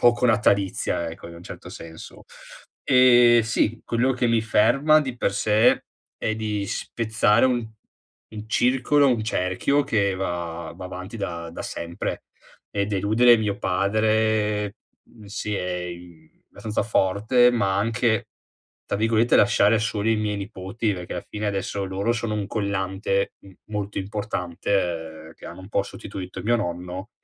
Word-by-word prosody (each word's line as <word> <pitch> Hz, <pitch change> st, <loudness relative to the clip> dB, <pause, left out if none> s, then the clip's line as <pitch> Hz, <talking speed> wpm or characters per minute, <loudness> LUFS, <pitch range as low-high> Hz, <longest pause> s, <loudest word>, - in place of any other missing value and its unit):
poco 120 Hz, +1 st, +4 dB
natalizia, 100 Hz, -7 st, +1 dB
ecco, 80 Hz, -, -10 dB
in 85 Hz, -, -11 dB
un 85 Hz, -, -12 dB
certo -, -, -10 dB
senso. 80 Hz, 0 st, -11 dB, 0.6 s
Ehm, 120 Hz, -2 st, +6 dB
sì, 115 Hz, 0 st, 0 dB
quello 125 Hz, +3 st, +1 dB
che 125 Hz, -1 st, 0 dB
mi 115 Hz, -1 st, +3 dB
ferma 135 Hz, +7 st, +4 dB
di 130 Hz, -4 st, -4 dB
per -, -, 0 dB
sé, 110 Hz, +5 st, +3 dB, 0.3 s
è 110 Hz, -, -2 dB
di 105 Hz, -2 st, -3 dB
spezzare 110 Hz, +1 st, +1 dB
un 125 Hz, -2 st, +1 dB, 0.7 s
un 110 Hz, 0 st, -8 dB
circolo, 135 Hz, +4 st, +3 dB
un 120 Hz, -4 st, +1 dB
cerchio 110 Hz, +8 st, 0 dB
che 100 Hz, -5 st, +1 dB
va 85 Hz, -3 st, -4 dB
va 90 Hz, -, -8 dB
avanti 95 Hz, +4 st, -8 dB
da 85 Hz, -4 st, -5 dB
da 85 Hz, -, -8 dB
sempre, 85 Hz, +3 st, -5 dB, 0.5 s
e 100 Hz, -1 st, -1 dB
deludere 110 Hz, +4 st, +4 dB
mio 105 Hz, -2 st, -2 dB
padre 105 Hz, +1 st, +1 dB, 0.3 s
mhmm, 110 Hz, -3 st, -17 dB
sì 105 Hz, +1 st, -4 dB
e 90 Hz, -1 st, -3 dB
in 85 Hz, -2 st, -14 dB, 0.2 s
abbastanza 110 Hz, -1 st, -3 dB
forte, 110 Hz, +4 st, +3 dB
ma 100 Hz, -5 st, +1 dB
anche 115 Hz, +1 st, 0 dB, 0.6 s
tra -, -, -1 dB
virgolette 115 Hz, +2 st, +3 dB
"lasciare 110 Hz, -1 st, +4 dB
soli" 110 Hz, -1 st, 0 dB
i -, -, +1 dB
miei 105 Hz, -1 st, -1 dB
nipoti 100 Hz, +2 st, -3 dB
perché 90 Hz, -1 st, -7 dB
alla 90 Hz, -, -6 dB
fine 105 Hz, 0 st, -5 dB
adesso 100 Hz, 0 st, -2 dB
loro 95 Hz, +4 st, -1 dB
sono 115 Hz, -2 st, -3 dB
un 105 Hz, -2 st, -2 dB
collante 100 Hz, -1 st, -1 dB
m 95 Hz, -, -15 dB
molto 105 Hz, -1 st, -4 dB
importante, 90 Hz, -5 st, -3 dB
ehm, 80 Hz, -, -15 dB
che -, -, -17 dB
hanno -, -, -9 dB
un 95 Hz, -, -11 dB
po' 100 Hz, -, +1 dB
sostituito 95 Hz, -1 st, -8 dB
mio 120 Hz, +3 st, +2 dB
nonno. 90 Hz, +1 st, -5 dB
105 Hz, 150 wpm, -24 LUFS, 95-115 Hz, 0.7 s, Ehm